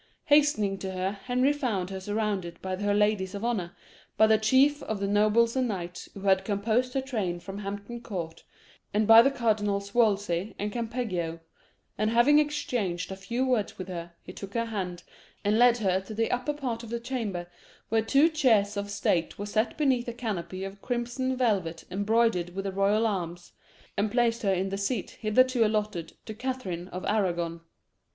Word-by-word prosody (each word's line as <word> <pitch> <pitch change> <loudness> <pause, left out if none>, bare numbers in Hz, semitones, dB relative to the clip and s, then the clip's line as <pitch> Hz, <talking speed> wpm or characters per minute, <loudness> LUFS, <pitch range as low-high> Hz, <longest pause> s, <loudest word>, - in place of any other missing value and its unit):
Hastening 285 -10 +3
to 190 -1 -4
her, 185 +1 -1
Henry 250 +7 +1
found 215 -11 -2
her 190 - -4
surrounded 205 -3 -2
by 185 0 -3
her 205 +1 0
ladies 210 -2 +1
of 200 +3 -4
honour, 190 -8 -2 0.4
by 220 - +7
the 220 0 +4
chief 265 +7 +4
of 220 -2 -3
the 200 - -1
nobles 215 +3 +3
and 260 -1 +1
knights 180 -4 -5
who 195 - -8
had 190 -1 +3
composed 220 +5 0
her 270 - +2
train 210 -10 -2
from 195 +3 -7
Hampton 205 +4 -6
Court, 170 -8 -6 0.5
and 215 +1 +3
by 225 +1 +9
the 270 - +4
Cardinals 205 -5 0
Wolsey 205 -4 +1
and 210 +1 -3
Campeggio; 220 -8 -3 0.6
and 215 0 +2
having 240 +6 +5
exchanged 240 - -1
a - - -4
few 235 +7 -2
words 245 -6 0
with 185 0 -6
her, 170 -1 -6
he 180 - -10
took 200 +2 -9
her 230 0 +1
hand, 185 -6 -4 0.4
and 210 +2 +2
led 245 -1 +6
her 190 -4 +1
to 200 +3 -9
the 225 +1 0
upper 250 +4 -1
part 250 -6 -3
of 230 - -9
the 235 +1 -2
chamber, 230 -8 -3 0.4
where 225 0 +3
two 275 +7 +4
chairs 230 -11 +2
of 200 0 -3
state 180 -4 0
were 205 - -4
set 215 +2 0
beneath 260 -5 +1
a 235 - -3
canopy 190 -5 -4
of 195 +1 -7
crimson 250 +1 -2
velvet 190 -10 0
embroidered 205 -3 +1
with 195 0 -3
the 195 - -1
royal 200 +3 +2
arms, 175 -4 -3 0.4
and 205 +2 +1
placed 235 -1 +2
her 200 - +2
in 190 +1 0
the 195 +1 -3
seat 215 +5 -2
hitherto 245 +3 +3
allotted 210 -6 -1
to 220 - -6
Catherine 215 -8 -4
of 185 0 -6
Arragon. 175 -5 0
210 Hz, 185 wpm, -28 LUFS, 190-235 Hz, 0.6 s, by